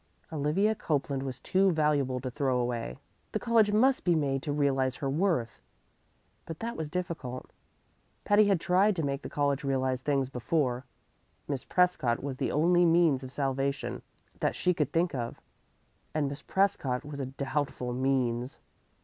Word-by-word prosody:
Olivia 160 +9 +2
Copeland 140 -7 -1
was 130 -2 -5
too 190 +6 +2
valuable 145 -5 +1
to 130 0 -4
throw 135 -2 0
away. 120 -1 -2 0.4
The 215 - 0
college 225 -3 +3
must 255 +5 +3
be 175 -2 +3
made 135 -3 0
to 145 - -3
realize 135 -3 +1
her 135 - -3
worth. 160 - 0 0.9
But 165 - -6
that 230 +5 -4
was 160 -2 -4
difficult. 165 -8 -5 0.7
Patty 205 +1 +5
had 195 -3 +3
tried 190 +5 +3
to 165 - -1
make 140 0 -2
the - - -7
college 145 -1 0
realize 130 -2 0
things 135 -1 +1
before. 130 0 -1 0.6
Miss 140 -3 -3
Prescott 175 -11 +1
was 135 -2 -4
the - - -1
only 175 +4 +4
means 165 -5 +4
of 130 - -7
salvation 135 0 -2 0.4
that - - 0
she 180 - +2
could 150 -5 -1
think 170 +1 +1
of, 120 -3 -4 0.8
and 150 -2 +1
Miss 140 +2 -6
Prescott 145 -10 0
was 145 -1 -7
a 135 - -2
doubtful 135 -2 -3
means. 125 -1 0
140 Hz, 160 wpm, -29 LUFS, 130-170 Hz, 0.9 s, Patty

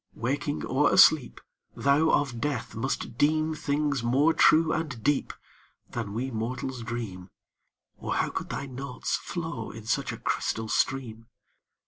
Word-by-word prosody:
Waking 145 +5 -2
or 140 +3 +2
asleep, 145 -7 +5 0.4
Thou 140 +3 +3
of 130 -5 +1
death 145 -7 -2
must 115 0 -3
deem 155 +2 +2
Things 145 -2 -1
more 135 +7 +3
true 160 0 +5
and 150 -9 -3
deep 145 +2 +1 0.6
Than 110 -4 -4
we 130 +3 -2
mortals 125 +3 -4
dream, 110 -6 -5 0.7
Or - - -3
how - - 0
could - - -5
thy 140 - -4
notes 135 0 -3
flow 160 -10 -5
in 110 0 -10
such 110 - 0
a - - -6
crystal 110 0 -2
stream? 115 -5 -1
130 Hz, 140 wpm, -27 LUFS, 115-145 Hz, 0.7 s, asleep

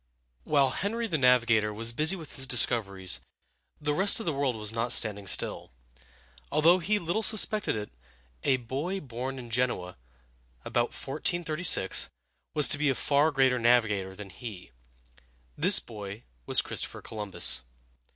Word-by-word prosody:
While 140 -3 +2
Henry 230 - -3
the 165 -9 -2
Navigator 120 -4 +3
was 115 +2 -2
busy 155 +8 +4
with 165 -5 -10
his 135 -1 -1
discoveries, 100 -7 +1 0.6
the 150 -1 -2
rest 195 +8 +4
of 225 - -7
the 165 - -1
world 135 -3 -1
was 105 0 -4
not 115 +1 -2
standing 100 -3 +1
still. - - 0 0.8
Although 165 +5 +4
he 205 +5 0
little 175 +3 -3
suspected 215 - +3
it, 105 -1 -6 0.5
a 130 - +2
boy 140 +11 -5
born 130 -2 -7
in 120 -2 -10
Genoa, 110 -7 -2 0.7
about 120 0 0
1436, 155 - +2 0.5
was 150 -2 +5
to 145 - +3
be 150 -1 +1
a 135 - 0
far 145 +4 +1
greater 130 -4 +1
navigator 110 -5 +1
than 100 -1 -11
he. 100 - -10 0.8
This - - +6
boy 105 -1 -10 0.2
was - - +4
Christopher - - -4
Columbus. 105 - 0
125 Hz, 145 wpm, -27 LUFS, 110-155 Hz, 0.8 s, This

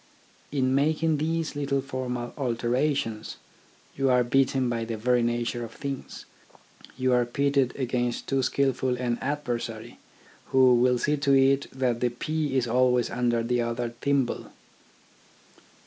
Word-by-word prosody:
In 130 -2 +1
making 155 +3 +2
these 160 +1 -2
little 140 -1 0
formal 130 -3 -4
alterations 125 -2 -1 0.6
you 135 -1 +1
are 125 -1 +4
beaten 130 +1 +2
by 115 -1 -1
the 115 0 -4
very 125 +2 +2
nature 120 0 -1
of 115 0 -8
things. 140 -2 -6 0.7
You 130 -1 +1
are 125 0 +4
pitted 140 +1 0
against 125 -2 -2
too 135 -1 0
skilful 130 -1 0
an 120 -1 -1
adversary, 135 -4 -4 0.5
who 130 -1 +5
will 125 +1 +3
see 150 +5 0
to 140 -1 +3
it 135 +1 +3
that 125 -3 -1
the 125 - +1
pea 150 +3 -2
is 125 -2 +1
always 125 0 +2
under 120 -1 0
the 120 +1 0
other 120 0 -2
thimble. 140 -3 0
130 Hz, 140 wpm, -26 LUFS, 120-140 Hz, 0.7 s, who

